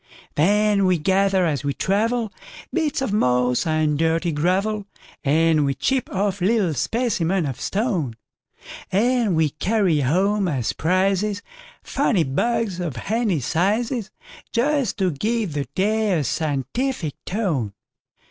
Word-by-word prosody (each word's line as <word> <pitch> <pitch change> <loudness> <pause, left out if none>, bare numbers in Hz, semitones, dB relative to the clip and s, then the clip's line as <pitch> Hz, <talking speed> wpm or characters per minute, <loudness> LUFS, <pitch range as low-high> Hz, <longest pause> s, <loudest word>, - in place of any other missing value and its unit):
Then 205 +4 +3
we 180 -1 +3
gather 190 +2 +2
as 145 -5 -1
we 140 -1 -1
travel, 220 +3 0 0.4
Bits 310 -5 0
of 215 - -2
moss 125 -4 +2
and 155 -2 +1
dirty 165 +1 +1
gravel, 195 +7 0 0.4
And 155 +1 +3
we 140 -1 0
chip 265 - 0
off 200 -1 -1
little 195 -3 +2
specimens 190 - 0
of 130 - -5
stone; 190 - -1 0.8
And 230 -1 +2
we 160 -2 +2
carry 185 -1 +1
home 190 +8 +1
as 130 -9 -1
prizesFunny 195 - -1
bugs, 225 - 0
of 170 -7 -3
handy 205 - -1
sizes, 215 - 0 0.4
Just 270 -1 +1
to 190 -4 +1
give 210 +3 -1
the 145 -1 -2
day 210 -1 +1
a 150 - 0
scientific 155 - -2
tone. 165 - -1
190 Hz, 125 wpm, -22 LUFS, 155-215 Hz, 0.8 s, Then